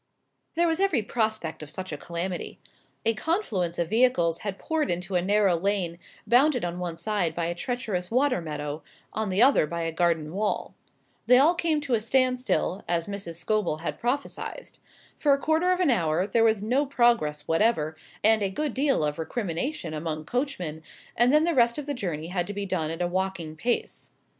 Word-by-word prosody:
There 340 Hz, +1 st, +3 dB
was 325 Hz, +1 st, +1 dB
every 385 Hz, -, +2 dB
prospect 215 Hz, -8 st, -2 dB
of 150 Hz, -, -8 dB
such 185 Hz, +4 st, -6 dB
a -, -, -2 dB
calamity. 170 Hz, +3 st, -4 dB, 0.5 s
A 225 Hz, -, +4 dB
confluence 215 Hz, -, -1 dB
of 170 Hz, -1 st, -2 dB
vehicles 220 Hz, -9 st, +3 dB
had 200 Hz, -2 st, -4 dB
poured 320 Hz, -2 st, -1 dB
into 175 Hz, +2 st, -2 dB
a 180 Hz, -, +3 dB
narrow 200 Hz, -1 st, +3 dB
lane 175 Hz, -2 st, -1 dB, 0.3 s
bounded 250 Hz, -2 st, +4 dB
on 175 Hz, +1 st, -4 dB
one 175 Hz, -2 st, -4 dB
side 175 Hz, -3 st, -1 dB
by 170 Hz, -, -1 dB
a 170 Hz, -, -1 dB
treacherous 190 Hz, -3 st, -3 dB
water 255 Hz, -3 st, +2 dB
meadow, 150 Hz, -1 st, -5 dB, 0.3 s
on 220 Hz, -2 st, -2 dB
the 190 Hz, +5 st, +4 dB
other 260 Hz, -, +5 dB
by 170 Hz, +2 st, -3 dB
a 165 Hz, -, -1 dB
garden 165 Hz, -2 st, 0 dB
wall. 210 Hz, +2 st, -1 dB, 0.5 s
They 250 Hz, -, +7 dB
all 295 Hz, +6 st, +5 dB
came 330 Hz, -3 st, 0 dB
to 280 Hz, -4 st, -2 dB
a 225 Hz, -, +2 dB
standstill, 255 Hz, -5 st, +1 dB
as 170 Hz, -1 st, 0 dB
Mrs. 200 Hz, -4 st, -6 dB
Scobel 170 Hz, -2 st, -1 dB
had 170 Hz, -, -4 dB
prophesied. 280 Hz, -, -3 dB, 0.4 s
For 290 Hz, -2 st, +3 dB
a -, -, +3 dB
quarter 320 Hz, +5 st, +2 dB
of 365 Hz, -, +1 dB
an 350 Hz, -7 st, +3 dB
hour 170 Hz, -4 st, +1 dB
there 225 Hz, +3 st, +2 dB
was 220 Hz, -3 st, +3 dB
no 260 Hz, +6 st, +1 dB
progress 235 Hz, -, +2 dB
whatever, 165 Hz, -3 st, +2 dB, 0.3 s
and 220 Hz, 0 st, +5 dB
a 200 Hz, -, +1 dB
good 295 Hz, +6 st, -2 dB
deal 270 Hz, -, +2 dB
of 150 Hz, 0 st, -1 dB
recrimination 175 Hz, -, -3 dB
among 155 Hz, 0 st, -4 dB
coachmen, 210 Hz, -, -3 dB, 0.3 s
and 240 Hz, +2 st, +4 dB
then 305 Hz, +2 st, +5 dB
the 340 Hz, +1 st, +2 dB
rest 235 Hz, -3 st, +3 dB
of 295 Hz, -, -4 dB
the 290 Hz, -, -2 dB
journey 170 Hz, -, -4 dB
had 180 Hz, -1 st, -1 dB
to 205 Hz, -, -4 dB
be 200 Hz, 0 st, -3 dB
done 180 Hz, -5 st, -1 dB
at 165 Hz, +2 st, -2 dB
a -, -, +1 dB
walking 180 Hz, -3 st, -2 dB
pace. 235 Hz, +9 st, -2 dB
200 Hz, 195 wpm, -26 LUFS, 170-250 Hz, 0.5 s, They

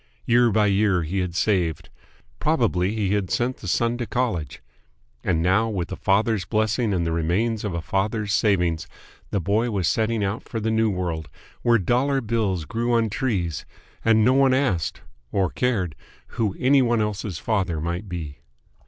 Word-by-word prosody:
Year 120 Hz, 0 st, +4 dB
by 105 Hz, 0 st, +3 dB
year 100 Hz, -3 st, +2 dB
he 90 Hz, +5 st, -2 dB
had 90 Hz, -2 st, -3 dB
saved. 85 Hz, -5 st, 0 dB, 0.5 s
Probably 110 Hz, -, +1 dB
he 100 Hz, -3 st, 0 dB
had 100 Hz, -3 st, 0 dB
sent 125 Hz, +2 st, 0 dB
the 95 Hz, -, -9 dB
son 115 Hz, +6 st, +1 dB
to 120 Hz, -, -3 dB
college. 100 Hz, -, -2 dB, 0.6 s
And 80 Hz, -2 st, +1 dB
now, 100 Hz, +6 st, +3 dB
with 95 Hz, -5 st, -3 dB
a -, -, -2 dB
father's 105 Hz, +1 st, +1 dB
blessing 110 Hz, +3 st, 0 dB
and 90 Hz, -3 st, 0 dB
the 85 Hz, -, -1 dB
remains 95 Hz, +8 st, 0 dB
of 100 Hz, -5 st, -3 dB
a 85 Hz, -, -3 dB
father's 105 Hz, +2 st, -1 dB
savings, 90 Hz, -8 st, +1 dB, 0.4 s
the 100 Hz, -, 0 dB
boy 105 Hz, +6 st, +1 dB
was 95 Hz, -6 st, 0 dB
setting 110 Hz, 0 st, +1 dB
out 100 Hz, +4 st, -2 dB
for 115 Hz, -, -5 dB
the 110 Hz, +1 st, -1 dB
New 110 Hz, 0 st, +2 dB
World, 85 Hz, -5 st, -3 dB, 0.3 s
where 120 Hz, -1 st, +4 dB
dollar 125 Hz, +8 st, +1 dB
bills 105 Hz, -8 st, -1 dB
grew 120 Hz, +5 st, -1 dB
on 115 Hz, -2 st, +1 dB
trees 95 Hz, -, -1 dB, 0.4 s
and 110 Hz, -1 st, +4 dB
no 130 Hz, -, +5 dB
one 135 Hz, -1 st, +4 dB
asked 100 Hz, -, 0 dB, 0.3 s
or 95 Hz, -3 st, +1 dB
cared 105 Hz, -10 st, 0 dB, 0.4 s
who 105 Hz, -4 st, -1 dB
any 135 Hz, +2 st, +4 dB
one 120 Hz, -2 st, +2 dB
else's 105 Hz, -3 st, -2 dB
father 95 Hz, -5 st, -1 dB
might 85 Hz, +5 st, -3 dB
be. 80 Hz, -6 st, -6 dB
105 Hz, 175 wpm, -24 LUFS, 90-115 Hz, 0.6 s, no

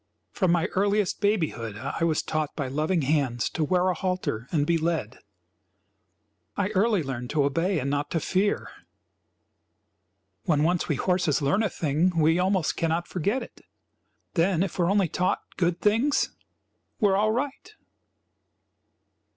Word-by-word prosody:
From 185 Hz, -3 st, +1 dB
my 170 Hz, -1 st, +2 dB
earliest 200 Hz, 0 st, +1 dB
babyhood 160 Hz, -, 0 dB
I 140 Hz, -, -3 dB
was 160 Hz, -2 st, +1 dB
taught 155 Hz, -2 st, -2 dB
by 140 Hz, -4 st, -2 dB
loving 155 Hz, +5 st, 0 dB
hands 135 Hz, -5 st, 0 dB
to 160 Hz, -, -1 dB
wear 180 Hz, +4 st, +2 dB
a -, -, +2 dB
halter 180 Hz, -, -2 dB
and 150 Hz, -4 st, +1 dB
be 170 Hz, -, +2 dB
led. 165 Hz, +1 st, -2 dB, 1.4 s
I 200 Hz, -1 st, 0 dB
early 210 Hz, -2 st, +2 dB
learned 125 Hz, -3 st, -5 dB
to 150 Hz, -2 st, +1 dB
obey 165 Hz, +7 st, +1 dB
and 140 Hz, -, -2 dB
not 145 Hz, 0 st, -1 dB
to 165 Hz, -, 0 dB
fear. 195 Hz, +6 st, 0 dB, 1.8 s
When 150 Hz, -5 st, +2 dB
once 175 Hz, +2 st, +1 dB
we 150 Hz, -, +2 dB
horses 180 Hz, -2 st, +1 dB
learn 145 Hz, +8 st, +1 dB
a 220 Hz, -, +1 dB
thing 165 Hz, +3 st, 0 dB
we 160 Hz, +2 st, +3 dB
almost 185 Hz, -3 st, +1 dB
cannot 165 Hz, +1 st, 0 dB
forget 200 Hz, +9 st, -1 dB
it; -, -, -14 dB, 0.7 s
then, 175 Hz, 0 st, +2 dB
if 190 Hz, -1 st, -5 dB
we 175 Hz, -, +3 dB
are -, -, +1 dB
only 200 Hz, -2 st, +3 dB
taught 180 Hz, +3 st, -1 dB
good 175 Hz, -1 st, 0 dB
things, 230 Hz, +8 st, +2 dB, 0.7 s
we 210 Hz, -, +4 dB
are 190 Hz, -, +3 dB
all 215 Hz, +2 st, +2 dB
right. 280 Hz, -, -4 dB
170 Hz, 155 wpm, -26 LUFS, 150-195 Hz, 1.8 s, we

